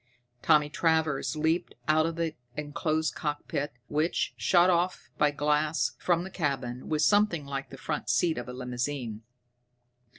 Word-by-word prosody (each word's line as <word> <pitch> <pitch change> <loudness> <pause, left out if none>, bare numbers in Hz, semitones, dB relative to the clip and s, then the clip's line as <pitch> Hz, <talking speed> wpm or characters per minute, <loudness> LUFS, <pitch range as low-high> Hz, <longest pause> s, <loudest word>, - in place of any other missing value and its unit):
Tommy 150 -2 +4
Travers 160 -1 +1
leaped 160 +3 0
out 155 +1 +4
of 165 - -3
the 165 -1 -1 0.2
enclosed 155 +1 -1
cockpit, 145 -1 -3 0.2
which, 155 +3 0
shut 175 -1 +4
off 180 0 0
by 150 - +5
glass 150 +2 +1
from 175 -1 +1
the 190 - -8
cabin, 135 -7 -3
was 155 -1 +2
something 205 -7 +3
like 135 0 -4
the 135 - -10
front - - -3
seat 125 +5 +2
of 125 - -7
a - - -6
limousine. 125 -2 -3
150 Hz, 145 wpm, -29 LUFS, 140-165 Hz, 0.2 s, by